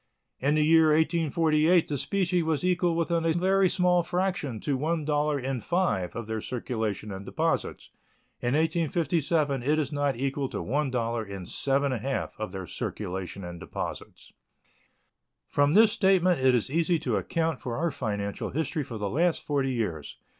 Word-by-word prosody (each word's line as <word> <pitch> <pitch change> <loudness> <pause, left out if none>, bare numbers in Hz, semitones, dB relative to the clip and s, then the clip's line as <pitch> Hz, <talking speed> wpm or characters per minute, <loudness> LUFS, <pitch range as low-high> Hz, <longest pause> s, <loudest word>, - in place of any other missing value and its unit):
In 140 +3 +2
the 155 - +3
year 160 0 +6
1848 160 +1 +3
the 145 - -2
specie 180 +5 0
was 160 -1 -1
equal 180 -2 +2
within 170 0 0
a 165 -1 +2
very 190 +2 +3
small 180 -1 +3
fraction 175 - -2
to 145 - 0
one 155 +3 -1
dollar 150 -1 +1
in 130 0 -2
five 110 - -1
of 115 - -4
their 110 0 -3
circulation 110 -4 -3
and 95 0 -6
deposits; - - -2 0.5
in 120 +3 0
1857 160 -3 +1
it 150 +5 +1
is 145 -4 -1
not 145 -2 0
equal 135 +2 -2
to - - -4
one 140 +4 0
dollar 115 -2 -1
in 100 -3 -7
seven 140 +7 +1
and 120 -5 -3
a 135 - -2
half 135 - -3
of 110 -4 -4
their 95 -1 -6
circulation 95 +3 -5
and 85 -1 -7
deposits. - - -7 1.1
From 145 +3 +2
this 220 0 +7
statement 185 -5 +3
it 130 -1 +5
is 120 +2 -1
easy 170 +2 +2
to - - -1
account 165 -1 -1
for 120 -3 -4
our 170 +1 0
financial 105 -5 -3
history 160 +1 -2
for 115 -3 -7
the 105 -1 -2
last 165 - +1
forty 140 -2 0
years. 95 - -3
145 Hz, 175 wpm, -27 LUFS, 120-170 Hz, 1.1 s, this